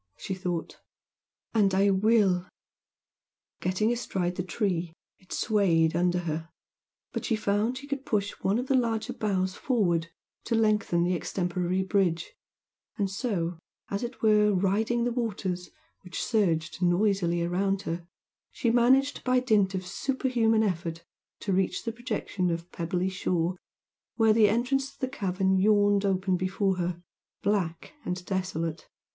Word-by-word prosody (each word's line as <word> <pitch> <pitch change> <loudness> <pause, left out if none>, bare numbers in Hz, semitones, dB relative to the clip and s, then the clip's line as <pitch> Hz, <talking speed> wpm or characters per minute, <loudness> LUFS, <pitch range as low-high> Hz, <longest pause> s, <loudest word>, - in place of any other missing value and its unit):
she 190 - -4
thought 180 -3 -4 0.7
"and 200 -4 +3
I 200 +1 +4
will!" 195 -3 +3 1.1
Getting 200 +6 +1
astride 185 -6 -2
the 180 - -1
tree, 180 -3 -2 0.3
it 185 - -23
swayed 170 -7 +2
under 175 +1 +2
her, 165 -1 -4 0.6
but - - -3
she 230 - +1
found 215 +3 0
she 275 - -8
could 280 -1 -4
push 205 -4 0
one 195 +3 +2
of 250 - -1
the 270 - 0
larger 230 -3 0
boughs 190 -4 -1
forward 180 -10 +1 0.4
to 230 - 0
lengthen 210 -6 +2
the 180 +1 +1
extemporary 180 +1 -1
bridge, 190 - 0 0.6
and 200 -2 0
so, 180 -6 -2 0.3
as 200 - -1
it 240 0 -6
were, 210 -1 +5
riding 215 +6 +1
the 245 - 0
waters, 190 -7 -3 0.3
which 180 -1 -4
surged 175 -7 0
noisily 175 -1 +2
around 195 +3 0
her, 170 -1 -4 0.4
she 235 - 0
managed 260 +4 +3
by 255 0 +3
dint 210 -6 +2
of 185 -1 -3
super 265 +7 -2
human 225 -3 +3
effort 170 -4 -2 0.4
to 195 - -1
reach 185 -1 0
the 230 - -2
projection 220 -6 -2
of 170 +1 -4
pebbly 175 +2 -1
shore 180 -1 -1 0.6
where 225 -2 +4
the 215 -2 +5
entrance 265 +5 0
to - - -26
the 260 - -1
cavern 190 -5 0
yawned 205 0 +4
open 190 -1 +1
before 190 +1 0
her, 175 -1 -3 0.4
black 185 - -1
and 180 0 -4
desolate. 175 -4 -3
195 Hz, 145 wpm, -28 LUFS, 180-220 Hz, 1.1 s, were